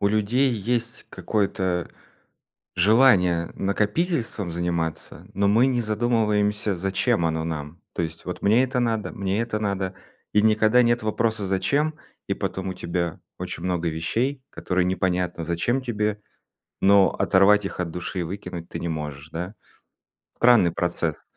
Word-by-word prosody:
у 100 - +3
людей 110 +6 +2
есть 115 +2 -2
какое-то 95 -4 -1 0.9
желание 90 -4 +4
накопительством 105 - -1
заниматься, 85 -1 -3
но 100 0 +2
мы 115 +5 +5
не 125 -2 +1
задумываемся, 105 -2 +1
зачем 95 +2 +1
оно 80 0 -1
нам. 80 0 -5
То - - -2
есть 80 0 -5
вот 90 - -5
мне 110 +5 +4
это 130 0 -1
надо, 110 -5 -1
мне 100 -1 -1
это 115 -2 -2
надо- 100 -2 -2 0.4
и 105 - +4
никогда 110 +3 +4
нет 120 0 +2
вопроса: 110 -1 0
зачем? 145 +11 +1 0.3
И - - +1
потом 95 0 -3
у 95 - -4
тебя 85 -1 -3 0.2
очень 85 - -5
много 90 -2 0
вещей, 120 - -1
которые 90 -1 -1
непонятно, 90 -2 -1
зачем 85 +10 0
тебе, 105 -4 -2 0.6
но 100 -1 +6
оторвать 100 +2 +4
их 95 - -6
от 90 -2 -1
души 90 +2 -4
и - - 0
выкинуть 85 -1 -6
ты - - -5
не 85 - -3
можешь, 75 -2 -5
да? 90 +6 -5 0.8
Странный 120 -8 +5
процесс. 85 -3 -2
100 Hz, 145 wpm, -24 LUFS, 85-115 Hz, 0.9 s, но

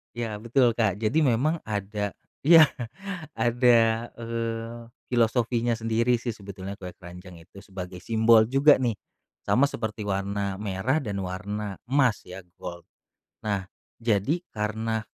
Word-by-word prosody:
Ya, 115 -3 -3
betul 120 +1 +2
Kak, 105 -3 +1
jadi 135 +9 +2
memang 135 +7 +2
ada 105 -1 -3 0.3
iya, 160 -1 +8 0.6
ada, 115 -1 +3
eee, 115 0 -4 0.2
filosofinya 120 0 +2
sendiri 115 +1 +1
sih 125 - -3
sebetulnya 100 -2 -7
kue 90 -2 -8
keranjang 90 -1 -12
itu, 100 +4 -15
sebagai 90 -2 -7
simbol 110 +2 +4
juga 135 +5 +5
nih, 125 -3 0 0.5
sama 135 - +3
seperti 110 -6 -4
warna 100 0 -2
merah 105 +9 0
dan 105 -6 -4
warna 100 +2 -4
emas 135 -5 +3
ya, 90 0 -9 0.2
gold. 85 -1 -7 0.6
Nah, 100 -3 -2 0.3
jadi 115 - +1 0.2
karena 110 +1 -2
110 Hz, 125 wpm, -26 LUFS, 100-120 Hz, 0.6 s, iya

